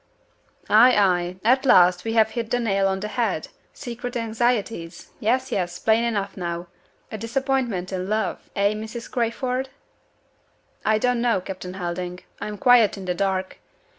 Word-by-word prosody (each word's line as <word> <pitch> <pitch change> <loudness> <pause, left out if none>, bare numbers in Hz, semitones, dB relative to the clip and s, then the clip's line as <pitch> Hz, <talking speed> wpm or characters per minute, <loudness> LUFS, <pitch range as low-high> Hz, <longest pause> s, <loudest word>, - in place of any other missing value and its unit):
"Ay! 240 +4 +6
ay! 180 -3 +2
At 255 +4 +4
last 180 -8 +5
we 225 - -1
have 220 -1 +4
hit 230 -1 -4
the 245 - +1
nail 195 -4 +1
on 190 0 -1
the 210 - -3
head! 215 -7 -2 0.2
Secret 245 0 -6
anxieties. 225 -6 -2
Yes! 255 +4 0
yes! 175 -4 -2
Plain 220 +4 +2
enough 205 -4 -2
now. 175 -2 -4 0.5
A 220 - -5
disappointment 235 -5 -1
in 185 +1 -3
love 215 -2 -2
eh, 200 +1 +2
Mrs. 220 +2 -7
Crayford?" 250 +2 -1 1.1
"I 215 0 +3
don't 245 +1 +1
know, 235 -4 +2
Captain 185 0 -7
Helding; 180 0 -4 0.2
I - - -4
am 210 -1 -6
quite 235 -2 +5
in 195 - -7
the 180 - 0
dark. 190 0 -2
215 Hz, 160 wpm, -23 LUFS, 185-235 Hz, 1.1 s, Ay